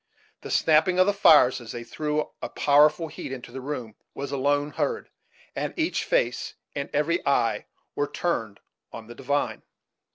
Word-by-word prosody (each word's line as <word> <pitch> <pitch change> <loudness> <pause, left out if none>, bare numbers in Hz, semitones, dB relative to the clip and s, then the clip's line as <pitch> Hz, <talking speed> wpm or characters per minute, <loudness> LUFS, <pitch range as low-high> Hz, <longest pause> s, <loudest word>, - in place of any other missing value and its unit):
The - - -8
snapping 160 +3 +3
of 185 - +6
the 205 - +2
fires, 150 -10 +5
as 115 - -8
they 120 -1 -6
threw 150 +4 -2
a - - -4
powerful 150 +3 +4
heat 145 - -8
into 125 -2 -7
the 130 +1 -7
room, 130 -5 -5 0.2
was 140 0 -5
alone 145 +2 0
heard, 460 - -2 0.4
and - - -3
each 325 +1 0
face - - 0 0.2
and 140 0 -3
every 165 +4 0
eye 115 -5 +1 0.3
were 145 - -1
turned 115 - -3 0.3
on 115 - -9
the 120 - -10
divine. 140 +3 -2
145 Hz, 165 wpm, -26 LUFS, 130-160 Hz, 0.4 s, of